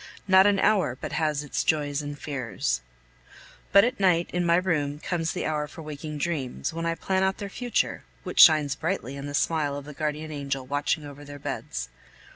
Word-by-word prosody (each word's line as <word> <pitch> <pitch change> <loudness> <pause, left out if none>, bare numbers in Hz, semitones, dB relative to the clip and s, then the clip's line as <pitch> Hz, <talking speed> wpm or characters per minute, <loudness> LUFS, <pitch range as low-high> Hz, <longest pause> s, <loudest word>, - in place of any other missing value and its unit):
Not 190 +1 +7
an 205 -1 +3
hour 195 - +2
but - - -5
has 150 -2 0
its 145 - -2
joys 145 -2 +1
and 145 0 -6
fears. 120 - -2 0.9
But 200 +1 +8
at 245 -1 0
night, 175 -3 +3
in 180 0 +1
my 170 0 +4
room, 155 -6 0
comes 165 +1 -2
the - - -3
hour 150 -1 -1
for 160 +2 -10
waking 150 0 -6
dreams, 140 - -2
when 165 0 -2
I 165 - 0
plan 190 +2 0
out 190 0 +1
their 200 -1 -5
future, 245 +3 -1 0.2
which - - -4
shines 155 -5 +8
brightly 150 -3 -3
in 140 0 -6
the 145 - -4
smile 150 -2 +1
of 140 -1 -6
the 150 - -9
guardian 155 +1 -3
angel, 140 -2 -3
watching 145 +2 -1
over 145 0 -10
their 145 0 -9
beds. - - -4
150 Hz, 200 wpm, -26 LUFS, 145-170 Hz, 0.9 s, But